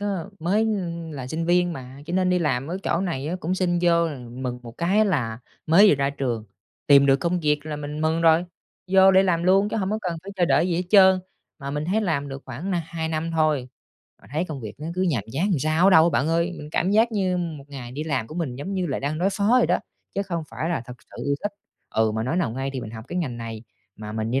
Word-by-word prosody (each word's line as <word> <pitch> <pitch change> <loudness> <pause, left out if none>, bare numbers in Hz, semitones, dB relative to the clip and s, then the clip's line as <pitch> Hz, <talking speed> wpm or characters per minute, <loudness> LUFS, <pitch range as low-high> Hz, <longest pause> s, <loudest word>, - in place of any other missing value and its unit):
á, 205 - -2 0.3
mới, 180 +6 +1
ưm, 175 -7 -2
là 135 -4 -6
sinh 160 +5 -3
viên 175 0 +3
mà 130 -2 -9
cho 170 - -5
nên 185 0 +2
đi 180 - +3
làm 140 -6 0
ở 175 +4 -4
chỗ 170 - 0
này 165 -8 -2
á 175 - -2
cũng 175 +3 -1
xin 180 -2 +1
vô 170 -1 +3
là 145 -4 -6
mừng 125 0 -4
một 120 0 -11
cái 195 +6 +3
là 125 - -1 0.3
mới 190 +7 +7
vừa - - +6
ra 140 0 0
trường, 125 -6 -3 0.4
tìm 140 -1 +7
được 135 -1 +5
công 170 +5 -1
việc 150 -1 0
là 150 -1 -4
mình 150 +1 -5
mừng 160 +1 +1
rồi, 165 +1 +5 0.5
vô 190 0 +7
để 190 0 +6
làm 175 -3 +1
luôn 195 +3 +4
chứ - - -3
hông 195 -3 -1
có 215 - 0
cần 175 -2 -2
phải 195 - -8
chờ 180 - +3
đợi 170 +1 +3
gì 175 - 0
hết 180 - 0
trơn. 190 -2 +7 0.4
Mà 140 0 -5
mình 150 +1 -2
thấy 195 +7 +1
làm 155 -8 -1
được 135 0 -7
khoảng 135 +10 -5
nà 175 -3 0
2 160 -1 -4
năm 160 +1 -2
thôi, 155 -5 +1 0.5
mà - - -17
thấy 155 +4 0
công 155 -6 -6
việc 110 -3 -7
nó 155 - -5
cứ 185 - 0
nhàm 155 - +1
chán 165 +10 0
làm 175 - +2
sao 155 +5 +1
á - - +7
đâu 165 -2 +6
bạn 135 +3 +1
ơi, 170 +2 +1
mình 150 - -8
cảm 180 +4 +1
giác 225 +3 +3
như 190 -4 0
một 165 -5 -4
ngày 130 -4 -8
đi 150 +4 -4
làm 140 -8 -1
của 155 - -10
mình 160 -8 -3
giống 165 +9 -5
như 185 -2 -1
là - - -2
đang 145 +3 -2
đối 185 +3 +2
phó 200 +1 0
vậy - - +3
đó, - - +2 0.4
chứ 200 - 0
không 170 -4 -3
phải 160 - -3
là 170 - -1
thực 125 - -9
sự - - -9
yêu 140 - +1
thích. 205 - -2 0.4
Ừ, 110 -1 +2
mà 110 0 -2
nói 130 +8 -1
nào 175 -10 +1
ngay 135 +3 -3
thì 130 - -4
mình 110 - -7
học 110 0 -9
cái 180 - -3
ngành 135 -9 -2
này 115 -2 -6 0.3
mà 105 0 -7
mình 110 +1 -2
đi 130 +3 +1
160 Hz, 280 wpm, -24 LUFS, 135-180 Hz, 0.5 s, mới